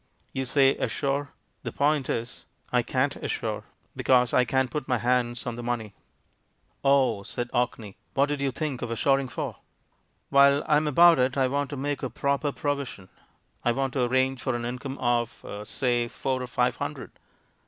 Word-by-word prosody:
You 135 0 -2
say, 135 +1 +4
'assure'; 140 +1 -1 0.3
the - - -5
point 145 -1 +1
is, 120 +1 -3 0.3
I - - +4
can't - - 0
assure, - - -3 0.3
because 125 -2 +3
I 125 - +4
can't 130 +1 +1
put 150 -1 -3
my 125 - +2
hands 120 0 0
on 120 - -2
the - - -5
money." 120 -3 -3 0.9
*'Oh," 135 -6 +3
said 120 +4 -5
Orkney. 120 -5 -2 0.2
"What 140 - +4
did 145 -1 -3
you 140 - +1
think 135 -1 -3
of 120 - -3
assuring 135 +3 +2
for?" 125 - -5 0.7
"While 140 +1 +6
I 150 -1 +4
am 150 +1 +1
about 170 +2 +6
it 130 +2 +1
I 130 -1 +3
want 140 +1 -1
to 145 - -5
make 145 +1 -2
a 130 - -2
proper 140 +4 0
provision; 140 -10 -4 0.5
I 120 - +2
want 135 0 -1
to 130 - +1
arrange 130 +1 +1
for 130 -3 -1
an 120 0 -3
income 130 +3 -5
of, 120 -1 -1 0.2
say, 120 -1 0
four 130 +2 -2
or 125 - -4
five 120 - 0
hundred. - - -5
130 Hz, 180 wpm, -26 LUFS, 120-140 Hz, 0.9 s, While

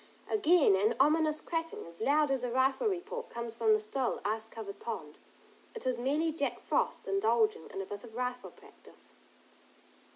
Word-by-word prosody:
Again 355 - +4
an 210 +5 +2
ominous 310 +2 +3
cracking, 330 -1 -3
as 170 +2 -11
loud 290 +3 +3
as 265 -2 0
a 250 - -1
rifle 265 - +2
report 430 +5 -3
comes 235 -1 -5
from 230 -1 +2
the - - +1
still 240 +4 -1
ice 220 +1 -1
covered 205 -3 -8
pond. 155 -10 -6 0.6
It 460 - -7
is 255 -2 0
merely 295 +6 +1
Jack 285 -3 -1
Frost - - -1
indulging 215 -2 +2
in 195 - -4
a - - -8
bit 205 +1 -7
of 225 -2 -12
rifle 250 0 -3
practice. - - -17
250 Hz, 170 wpm, -32 LUFS, 220-305 Hz, 0.6 s, Again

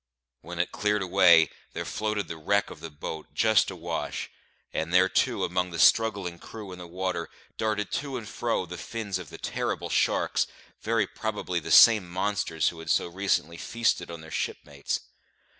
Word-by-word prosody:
When 85 +2 -8
it 85 - 0
cleared 105 -1 0
away, 90 -4 +6 0.2
there - - -4
floated 105 -1 -2
the 80 - -5
wreck 100 +6 0
of - - -10
the 80 - -7
boat, 75 +1 -7
just 110 -2 +4
awash; - - -4 0.4
and 80 +1 -2
there 90 +1 +6
too, - - +1
among 90 0 0
the 85 - -6
struggling 100 -2 +3
crew 105 -4 -9
in 90 - -9
the 90 - -8
water, 90 -1 -3 0.3
darted 105 -2 -1
to 140 -3 -5
and 110 -3 -7
fro 115 -3 -1
the 90 0 -8
fins 105 -5 -4
of 90 - -9
the - - -9
terrible - - -3
sharks, - - +1 0.3
very 115 -1 +1
probably 105 -4 -3
the 80 - -8
same 110 -6 +7
monsters 95 -3 0
who 85 - -10
had 80 -1 -8
so - - +3
recently 85 -3 0
feasted 115 -5 0
on 85 -1 -7
their 80 0 -12
shipmates. 70 -1 -3
90 Hz, 175 wpm, -27 LUFS, 85-105 Hz, 0.4 s, same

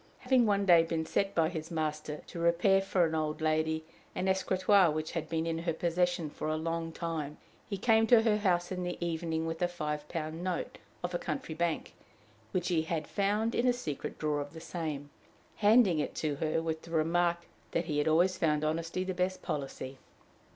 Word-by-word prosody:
Having 250 -2 +4
one 200 -1 +2
day 175 -3 +7
been 165 -1 -1
set 195 +4 0
by 165 -1 +4
his 160 -2 -5
master 155 -2 -3
to 170 - -8
repair 170 +3 +4
for 190 -2 +2
an 160 - -2
old 155 -1 -1
lady 160 0 0 0.3
an 185 - -1
escritoire 190 0 +4
which 155 +1 -2
had 160 -2 -4
been 160 0 -1
in 165 0 -1
her 165 0 -1
possession 175 -1 0
for - - -5
a 155 0 0
long 165 +1 -2
time, 160 -3 -4 0.3
he 200 - -2
came 225 +2 +4
to 235 -2 +6
her 215 -2 +3
house 180 -4 +1
in 180 -1 -2
the 175 0 -3
evening 165 -1 -2
with 165 +1 -4
a 175 - +3
five 150 -4 -4
pound 160 0 -4
note 180 -2 -3 0.2
of 175 0 -2
a 175 - 0
country 155 0 -4
bank, 170 0 -1 0.6
which 180 0 -1
he 170 -3 +2
had 160 -1 -2
found 210 +3 0
in 240 - +2
a 250 - +5
secret 155 - -5
drawer 150 -1 0
of 145 +1 -7
the 165 - -8
same, 155 -4 -5 0.5
handing 205 -5 +5
it - - -2
to 150 -3 -1
her 160 +1 0
with 160 -1 -2
the - - -13
remark 170 +1 +1 0.2
that 170 - -1
he 150 -3 -1
had 145 - +1
always 175 +4 +3
found 150 -2 +2
honesty 165 +4 -1
the 185 0 -2
best 185 +1 -1
policy. 135 -2 -4
165 Hz, 205 wpm, -31 LUFS, 155-185 Hz, 0.6 s, day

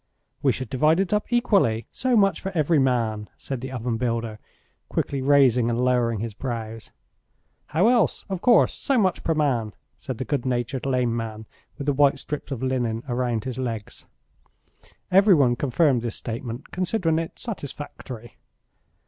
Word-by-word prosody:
"We - - +4
should 130 -4 -5
divide 155 +6 +3
it 195 0 0
up 210 +3 -1
equally, 195 - +2
so 255 -2 +1
much 195 -4 +3
for 195 - -3
every 155 0 +3
man," 115 -5 0
said 135 -3 -5
the 130 0 -6
oven 120 -2 -2
builder, 115 -2 -2 0.5
quickly 140 -1 -1
raising 130 -4 +4
and 120 +2 0
lowering 120 -4 +1
his 115 -1 -4
brows. 115 -2 -5 0.8
"How 175 +7 +2
else? 240 -1 +2
Of 190 -3 -4
course, 240 -2 +5
so 275 -2 0
much 190 -5 +1
per 165 - +1
man," 125 -8 0 0.2
said 130 -5 -5
the 130 - -4
good 135 +2 -1
natured 125 +1 -2
lame 125 -3 +1
man 110 -1 -5 0.3
with 140 - -5
the 145 - +2
white 140 0 +4
strips 150 -1 -5
of 130 -2 -4
linen 120 -3 -1
round 120 -3 -1
his 130 -1 -5
legs. 115 -5 -5 1.0
Every 195 +1 +6
one 130 -5 +3
confirmed 135 0 +2
this 120 -1 -3
statement, 120 +2 -6
considering 180 -3 0
it 165 - -5
satisfactory. 140 - -8
130 Hz, 165 wpm, -24 LUFS, 115-155 Hz, 1.0 s, Every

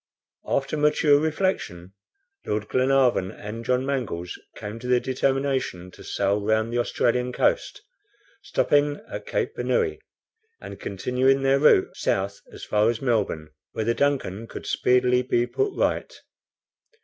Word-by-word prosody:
After 140 +2 -1
mature 150 -1 +4
reflection, 155 - -2 0.5
Lord 105 0 -1
Glenarvan 130 -6 +2
and 110 +3 -7
John 125 +2 +1
Mangles 110 -11 -3 0.2
came 105 +2 -7
to 125 - -7
the 125 0 +4
determination 130 -8 -1
to - - -14
sail 100 +1 0
round 110 +2 +1
the 120 - +1
Australian 125 +1 0
coast, - - 0 0.6
stopping 145 0 +1
at - - -6
Cape - - -1
Bernouilli, 455 -4 0 0.6
and - - -9
continuing 130 +7 +1
their 135 +1 +3
route 145 -9 +4
south 100 +1 -1
as - - -11
far 105 +1 +2
as 115 -1 -1
Melbourne, 105 - -1 0.2
where 110 - -2
the 115 - +2
DUNCAN 115 -7 -1
could - - -8
speedily 125 0 +2
be 120 -1 +1
put 410 - -1
right. - - 0
125 Hz, 135 wpm, -25 LUFS, 105-135 Hz, 0.6 s, mature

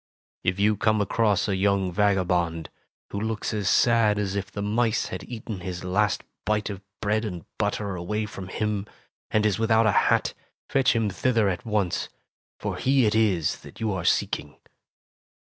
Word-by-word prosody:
"If 90 +2 0
you 105 +1 +3
come 110 0 +2
across 105 0 +2
a 100 - +1
young 95 -1 +1
vagabond^ 90 -5 +1 0.4
who 100 - -3
looks 110 +1 -2
as 105 -3 0
sad 115 -1 +4
as 100 -1 -1
if 100 0 -3
the 100 - -4
mice 110 +2 +1
had - - -5
eaten 110 -4 -6
his 90 -1 -5
last 95 +2 +1 0.2
bite 105 0 0
of 100 -1 -7 0.2
bread 105 +1 +1
and 90 -7 -5
butter 105 -1 -1
away 105 +5 -2
from 100 -3 -8
him, 105 +1 -2 0.4
and 110 0 +2
is 105 -2 +1
without 115 0 +4
a 110 - +4 0.2
hat, - - +2 0.3
fetch 135 -2 +3
him 110 -3 +1
thither 115 +1 +2
at 90 +5 -4
once, 105 -5 0 0.5
for - - -3
he 135 -2 +3
it 105 - +2
is 100 -8 +2
that - - -13
you 110 -2 0
are 95 -3 -3
seeking." 75 -2 0
105 Hz, 175 wpm, -26 LUFS, 95-110 Hz, 0.5 s, sad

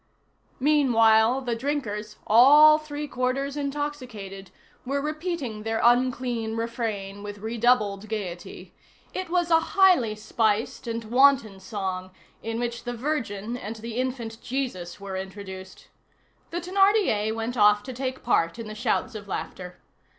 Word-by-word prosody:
Meanwhile, 245 -4 +4
the 240 -3 -2
drinkers, 225 -5 -3
all 295 +7 +8
three 300 -1 -6
quarters 270 +2 -1
intoxicated, 255 -10 -5 0.3
were 275 +2 -1
repeating 305 -6 -3
their 225 +1 -2
unclean 240 -2 +2
refrain 220 -4 -3
with 205 0 -7
redoubled 215 -2 +1
gayety; 185 -6 -6 0.4
it 370 -2 -4
was 350 -1 0
a 325 - +7
highly 345 - +3
spiced 220 +2 -1
and 230 0 -3
wanton 240 -3 +3
song, 190 -2 -4 0.3
in 225 0 -3
which 240 -1 -3
the 245 - -4
Virgin 235 -5 -3
and 225 -2 -6
the 225 +1 -7
infant 245 -3 -3
Jesus 235 -11 -4
were 195 -1 -6
introduced. 190 0 -8 0.6
The 345 - -3
Thénardier 375 - +2
went 225 +2 -3
off 210 -2 +5
to 260 - -7
take 260 +1 -4
part 170 -6 +1
in 230 - -6
the 215 - -6
shouts 225 +2 -1
of 210 -2 -8
laughter. 180 -2 -6
230 Hz, 135 wpm, -26 LUFS, 210-275 Hz, 0.6 s, all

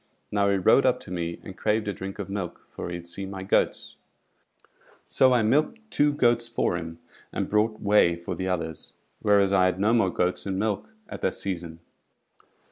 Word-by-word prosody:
Now 100 -1 +2
he 100 - +2
rode 95 +8 +5
up 125 0 +2
to 95 - -10
me 85 -1 -3
and 95 - -9
craved 110 +1 0
a 100 - -1
drink 95 +1 -7
of 100 -3 -5
milk, 100 -3 -5
for - - -6
he 85 - -4
had 85 0 -8
seen 95 +3 -6
my 95 -1 -6
goats; 95 - 0 1.1
so 130 -1 +4
I 120 -3 +3
milked 150 - +2
two 145 0 +3
goats 120 -4 +2
for 115 -6 0
him, 80 -1 -6 0.3
and - - -2
brought 110 +1 +1
whey 100 -4 +4
for 85 0 -6
the 95 - -3
others, 80 -3 -4 0.3
whereas 100 -1 +3
I 95 -1 +5
had 95 0 0
no 105 +3 +3
more 115 -5 +3
goats 90 +2 -1
in 95 -1 -2
milk 105 - -1 0.2
at - - -8
that - - 0
season. 85 -4 -5
100 Hz, 200 wpm, -26 LUFS, 90-110 Hz, 1.1 s, rode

